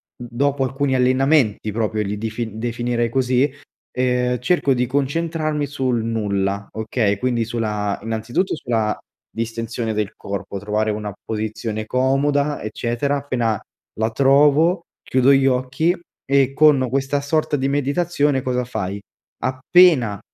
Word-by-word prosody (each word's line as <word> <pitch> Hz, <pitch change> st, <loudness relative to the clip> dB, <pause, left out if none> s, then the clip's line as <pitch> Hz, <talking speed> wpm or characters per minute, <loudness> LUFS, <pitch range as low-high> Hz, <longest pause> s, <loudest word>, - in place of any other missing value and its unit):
dopo 135 Hz, +3 st, -1 dB
alcuni 135 Hz, +1 st, 0 dB
allenamenti 130 Hz, -4 st, +2 dB
proprio 110 Hz, -1 st, -1 dB
li 105 Hz, 0 st, -3 dB
dif 110 Hz, +2 st, -4 dB
definirei 120 Hz, +1 st, -2 dB
così, 130 Hz, +2 st, +2 dB, 0.4 s
ehm, 125 Hz, -1 st, 0 dB
cerco 140 Hz, 0 st, +2 dB
di 125 Hz, 0 st, +1 dB
concentrarmi 150 Hz, +2 st, -1 dB
sul 130 Hz, -4 st, -1 dB
nulla, 100 Hz, -3 st, -1 dB
okay, 110 Hz, -2 st, 0 dB
quindi 120 Hz, -3 st, 0 dB
sulla 105 Hz, -3 st, -2 dB
innanzitutto 115 Hz, -, -1 dB
sulla 110 Hz, -6 st, -1 dB, 0.3 s
distensione 115 Hz, 0 st, -3 dB
del 105 Hz, -2 st, -2 dB
corpo, 100 Hz, 0 st, -5 dB
trovare 105 Hz, +1 st, 0 dB
una 105 Hz, -1 st, -4 dB
posizione 110 Hz, 0 st, -3 dB
comoda, 140 Hz, +4 st, +1 dB
eccetera, 120 Hz, +6 st, -2 dB
appena 120 Hz, -6 st, -1 dB, 0.4 s
la 110 Hz, +1 st, +1 dB
trovo 145 Hz, -, +4 dB, 0.2 s
chiudo 130 Hz, +1 st, +3 dB
gli 135 Hz, 0 st, +4 dB
occhi 130 Hz, +7 st, +1 dB, 0.3 s
e 135 Hz, -1 st, +2 dB
con 145 Hz, -4 st, +4 dB
questa 135 Hz, +2 st, 0 dB
sorta 155 Hz, +1 st, 0 dB
di 135 Hz, -, 0 dB
meditazione 145 Hz, 0 st, +1 dB
cosa 125 Hz, -1 st, -1 dB
fai? 100 Hz, -4 st, -4 dB, 0.4 s
Appena 130 Hz, -, +4 dB
125 Hz, 125 wpm, -21 LUFS, 110-140 Hz, 0.4 s, trovo